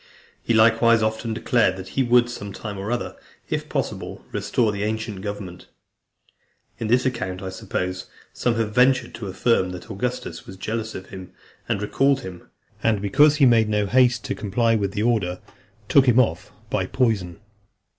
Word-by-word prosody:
He 115 - 0
likewise 115 0 +5
often 110 +1 -1
declared 110 -4 +1
that 95 0 -8
he 135 - 0
would, 120 -1 +4
some 100 -4 -7
time 100 -1 -6
or 100 +4 -4
other, 120 - -3 0.4
if - - -2
possible, - - -4
restore 115 -4 0
the 100 -1 -5
ancient 110 -2 -3
government. 100 -3 -7 1.1
In 115 - -2
this 125 +3 +3
account, 95 -7 -3
I 95 - -4
suppose, 90 -1 -4 0.3
some 120 -1 0
have 110 -2 -1
ventured 130 0 +3
to 115 -2 -6
affirm 95 0 +1
that 90 - -9
Augustus - - -4
was 95 - -10
jealous 110 +2 -4
of 95 - -8
him, 95 -2 -10 0.4
and 105 -3 0
recalled 135 +5 +2
him; 90 -6 -10 0.3
and 110 -2 +2
because 145 +10 +4
he 145 -3 +4
made 115 -3 +4
no 105 -1 +1
haste 125 +2 +3
to - - -2
comply 115 +3 0
with 100 -3 0
the 105 - -1
order, 100 -7 0 0.5
took 135 -2 +5
him 125 0 +5
off 95 -6 0 0.2
by 135 - 0
poison. 105 -8 0
110 Hz, 175 wpm, -23 LUFS, 95-120 Hz, 1.1 s, likewise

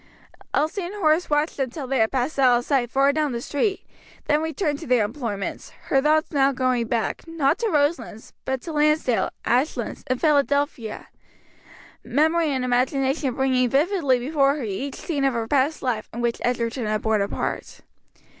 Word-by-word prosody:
Elsie 310 +7 0
and 360 +3 -6
Horace 330 -3 +2
watched 295 +2 0
them 270 -2 -1
till 275 +2 -6
they 265 0 -1
had 220 0 +2
passed 265 +3 -1
out 250 -2 +5
of 240 - -4
sight 260 -5 +1
far 275 +2 +3
down 300 -3 0
the 235 - -2
street, 340 - -1 0.4
then 300 0 +2
returned 320 -2 -2
to - - -9
their 245 -4 +3
employments; 210 -4 -5 0.2
her 270 - +3
thoughts 310 +2 +2
now 275 -2 +3
going 255 -3 0
back, 230 +6 -2
not 325 0 +1
to 460 - 0
Roselands, 285 - -1
but 265 -1 -3
to 335 - -6
Lansdale, 300 -5 +2 0.2
Ashlands, 255 +6 -1
and 255 0 -1
Philadelphia; 285 -6 0 0.9
memory 315 +6 +2
and 260 -3 -1
imagination 265 +2 0
bringing 260 -2 +2
vividly 290 - +2
before 275 +2 +1
her 295 - -5
each 230 +7 -4
scene 295 -6 -3
of 270 -2 +2
her 230 -1 -2
past 285 +4 +1
life 235 -5 -2
in 235 - -7
which 235 -1 -1
Egerton 235 -1 -1
had 215 0 -1
borne 220 -2 +2
a 200 - 0
part. - - -4
270 Hz, 180 wpm, -23 LUFS, 245-300 Hz, 0.9 s, out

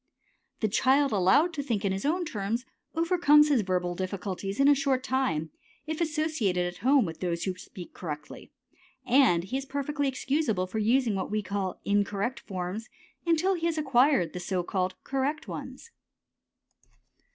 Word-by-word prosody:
The 215 - +2
child 270 +6 +3
allowed 210 - +3
to 295 - -2
think 230 -7 -2
in 195 - +1
his 195 +4 -3
own 345 +4 +1
terms 225 0 -3 0.3
overcomes 325 -3 +5
his 275 -6 +3
verbal 180 -2 -1
difficulties 195 +2 -4
in 275 - +5
a 290 - +8
short 270 -2 0
time 255 - -1 0.3
if 315 +1 -4
associated 305 - 0
at 175 0 -5
home 260 +2 +4
with 160 -2 -6
those 170 -2 -2
who 190 -2 -2
speak 180 -1 -11
correctly, 150 -4 -7 0.5
and 245 -9 +4
he 210 +8 -3
is 270 - -5
perfectly 285 +1 -2
excusable 265 -7 0
for 200 +4 -4
using 235 +1 +2
what 190 -1 -2
we 215 0 -1
call 195 -1 -3
incorrect 205 +4 0
forms 190 +3 -5 0.4
until 335 +3 +3
he 335 -2 -1
has 330 -1 -1
acquired 265 - +3
the 180 - -4
so 180 0 -2
called 185 0 -1
correct 275 +4 -2
ones. 465 - -8
230 Hz, 165 wpm, -28 LUFS, 185-285 Hz, 0.5 s, a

